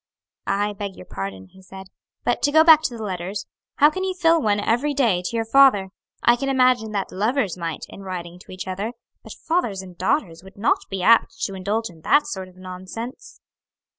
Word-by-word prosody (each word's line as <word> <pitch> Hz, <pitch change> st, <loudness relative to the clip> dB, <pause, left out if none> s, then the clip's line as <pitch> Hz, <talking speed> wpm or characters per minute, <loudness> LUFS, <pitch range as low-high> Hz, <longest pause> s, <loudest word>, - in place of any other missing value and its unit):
"I 205 Hz, +1 st, 0 dB
beg 200 Hz, -1 st, -6 dB
your -, -, -12 dB
pardon," 95 Hz, -, -7 dB
he 190 Hz, -, -18 dB
said; 190 Hz, +1 st, -11 dB, 0.4 s
"but -, -, 0 dB
to 290 Hz, -, +2 dB
go 315 Hz, +1 st, +6 dB
back 320 Hz, -2 st, +8 dB
to 240 Hz, -, -2 dB
the 220 Hz, -, -6 dB
letters, 190 Hz, 0 st, -4 dB, 0.3 s
how 295 Hz, +2 st, +5 dB
can 375 Hz, +4 st, -4 dB
you 380 Hz, -1 st, -2 dB
fill 330 Hz, -2 st, +3 dB
one 205 Hz, -3 st, +1 dB
every 255 Hz, +8 st, 0 dB
day 225 Hz, -10 st, +2 dB
to 205 Hz, -, -4 dB
your 225 Hz, -1 st, 0 dB
father? 225 Hz, -6 st, +5 dB, 0.3 s
I 240 Hz, 0 st, +5 dB
can 275 Hz, +2 st, -2 dB
imagine 255 Hz, -4 st, +3 dB
that 200 Hz, -2 st, -2 dB
lovers 215 Hz, -, 0 dB
might, 165 Hz, -3 st, -5 dB
in -, -, -11 dB
writing 180 Hz, -2 st, -7 dB
to -, -, -15 dB
each 185 Hz, 0 st, -7 dB
other, 200 Hz, +5 st, -3 dB, 0.3 s
but -, -, -10 dB
fathers 240 Hz, -, -2 dB
and 180 Hz, -2 st, -12 dB
daughters 185 Hz, -, -1 dB
would 190 Hz, +1 st, -15 dB
not 205 Hz, -, 0 dB
be 190 Hz, -2 st, -3 dB
apt 230 Hz, +3 st, +4 dB
to 195 Hz, -, -2 dB
indulge 200 Hz, +3 st, -2 dB
in 160 Hz, -2 st, -18 dB
that 290 Hz, -, +3 dB
sort 190 Hz, -1 st, -5 dB
of 185 Hz, -, -18 dB
nonsense." 185 Hz, -, -9 dB
205 Hz, 210 wpm, -22 LUFS, 185-255 Hz, 0.4 s, back